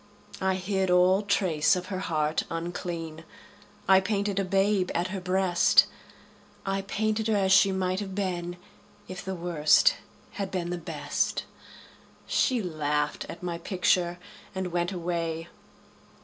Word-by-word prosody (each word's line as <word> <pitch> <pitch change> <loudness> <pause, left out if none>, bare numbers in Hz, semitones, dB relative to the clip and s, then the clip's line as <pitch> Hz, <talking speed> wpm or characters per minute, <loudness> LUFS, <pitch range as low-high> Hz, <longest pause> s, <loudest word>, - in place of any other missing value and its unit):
I 190 0 +1
hid 190 0 -1
all 180 +2 +4
trace 185 -6 +2
of 180 - -5
her 185 - -2
heart 155 -4 0
unclean; 165 -1 -5 0.6
I 190 0 +7
painted 200 0 -1
a - - +1
babe 195 0 +1
at 175 +2 0
her 190 -1 -4
breast; 185 -1 +4 0.8
I 195 0 -1
painted 215 +2 -1
her 220 - +2
as 190 -2 +2
she 195 0 +6
might 185 0 -1
have 195 -2 -5
been 175 -3 -3 0.5
If 185 0 -7
the 190 -1 -4
Worst 170 - +3 0.3
had 195 -2 -4
been 175 -2 -3
the 175 - -3
Best. 165 - -2 0.8
She 250 -5 +1
laughed 150 -3 -1
at 170 - -9
my 170 -1 -3
picture 175 -1 +1 0.4
and 190 -1 -3
went 175 +1 0
away. 170 -2 -3
185 Hz, 140 wpm, -27 LUFS, 170-195 Hz, 0.8 s, I